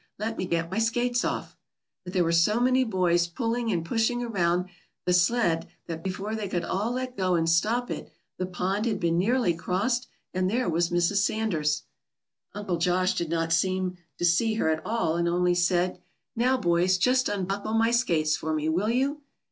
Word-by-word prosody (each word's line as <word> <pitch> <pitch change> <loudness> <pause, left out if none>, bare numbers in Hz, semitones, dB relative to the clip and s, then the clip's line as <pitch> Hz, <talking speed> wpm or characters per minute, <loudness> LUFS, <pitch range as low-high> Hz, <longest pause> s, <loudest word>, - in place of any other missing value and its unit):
Let 220 +2 -3
me 185 - -3
get 170 0 -1
my 205 - -1
skates 240 +2 +1
off." - - -3 0.5
But 180 0 -8
there 180 -3 +3
were 165 - +1
so 170 +7 +3
many 255 +1 +3
boys 180 -6 +1
pulling 230 +5 -2
and 170 -4 -1
pushing 230 +5 0
around 180 -5 0 0.4
that 180 - +2
sled 175 -3 +2 0.2
that 165 -1 -6
before 195 +3 -4
they 215 -2 -3
could 175 -2 -1
all 210 +6 -1
let 255 0 -4
go 185 -4 +1
and 165 -1 +1
stop 220 +9 +1
it, - - -5 0.3
the 185 - -1
pond 190 +4 -1
had 210 -4 -1
been 170 0 +1
nearly 230 -1 +2
crossed, 200 +9 -1 0.3
and 185 0 0
there 245 +5 0
was 170 +1 +1
Mrs. 175 +3 +1
Sanders. 175 -8 0 0.7
Uncle 200 -4 -2
Josh 180 +2 +1
did 170 - -2
not 165 0 0
seem 185 +1 0 0.2
to 175 - 0
see 220 +6 +2
her 160 - +1
at 160 0 -2
all, 215 -7 0
and 170 0 +1
only 175 +1 +2
said, 175 +1 +1 0.3
"Now, 250 +3 +2
boys, 180 -2 +2
just 255 +5 +2
unbuckle 200 +2 -2
my 225 +1 +3
skates 160 -10 +2
for 160 0 -2
me, 155 +1 -1
will 185 +7 0
you?" 275 +5 0
185 Hz, 190 wpm, -27 LUFS, 170-225 Hz, 0.7 s, there